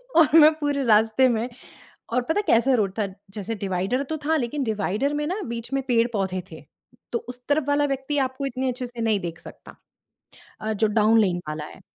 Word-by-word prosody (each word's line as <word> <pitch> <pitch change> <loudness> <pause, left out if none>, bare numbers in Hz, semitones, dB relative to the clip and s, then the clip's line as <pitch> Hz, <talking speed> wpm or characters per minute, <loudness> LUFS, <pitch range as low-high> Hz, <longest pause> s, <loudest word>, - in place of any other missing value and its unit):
और 320 -2 +5
मैं 310 0 +8
पूरे 290 -2 0
रास्ते 220 +3 +4
में 235 +1 -1 0.6
और 250 - +3
पता 320 +10 0
है - - -1
कैसा 235 +4 +4
रोड 200 -5 0
था, 205 - +1 0.2
जैसे 210 +2 -4
डिवाइडर 195 +6 -1
तो 315 - -2
था 320 +2 +2
लेकिन 270 +1 -2
डिवाइडर 220 +4 -1
में 295 0 -1
न 375 +6 -2
बीच 235 +2 -6
में 275 - +1
पेड़ 235 -2 +3
पौधे 190 -3 -1
थे। 160 - -10 0.5
तो 235 - 0
उस 250 0 -8
तरफ़ 290 0 +2
वाला 290 0 +3
व्यक्ति 275 +1 -2
आपको 260 +2 -6
इतने 260 0 -2
अच्छे 250 0 -4
से 240 -1 -7
नहीं 220 -3 +2
देख 170 -2 -6
सकता। - - -13 0.9
अ, 220 0 -1
जो 215 +1 +2
डाउन 215 +1 +4
लेन 185 -5 +2
वाला 150 0 -4
है। 185 - -13
235 Hz, 210 wpm, -24 LUFS, 210-275 Hz, 0.9 s, मैं